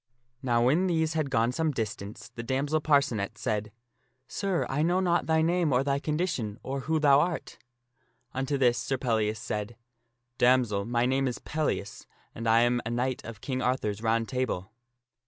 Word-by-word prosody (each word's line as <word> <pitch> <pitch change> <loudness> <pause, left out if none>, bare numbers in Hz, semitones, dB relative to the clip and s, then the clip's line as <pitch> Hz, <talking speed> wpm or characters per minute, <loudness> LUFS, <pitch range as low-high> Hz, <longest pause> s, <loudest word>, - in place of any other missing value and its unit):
Now 120 -3 +2
when 160 +9 +3
these 160 -2 +1
had 155 -3 -1
gone 115 -2 +2
some 160 +4 0
distance 105 -4 -5
the 115 - -6
damsel 140 +6 0
Parcenet 120 -9 +1
said, 105 0 -2 0.3
" 130 +1 -45
Sir, 195 -4 -1
I 135 +3 -1
know 175 +3 +2
not 175 -2 +1
thy 160 0 +3
name 170 -2 +2
or 125 +1 +3
thy 140 0 0
condition, 150 - -2
or 135 +1 -3
who 160 -1 +3
thou 140 -2 +6
art? 170 +2 -2 0.4
" 120 +1 -43
Unto 135 +2 -1
this 125 -3 +3
Sir 135 - -1
Pellias 110 -4 0
said, 105 +2 -4 0.3
" 120 +1 -51
Damsel, 120 -6 +3
my 120 +1 +1
name 135 +1 +1
is 125 - -2
Pellias 155 -10 -3 0.3
and 115 0 -5
I 115 +1 +5
am 120 0 +2
a 110 - -4
knight 125 +2 -1
of 115 -2 -9
King 130 -2 -2
Arthur's 110 -5 -1
Round 115 0 +1
Table." 120 -6 -2
130 Hz, 185 wpm, -28 LUFS, 115-150 Hz, 0.4 s, thou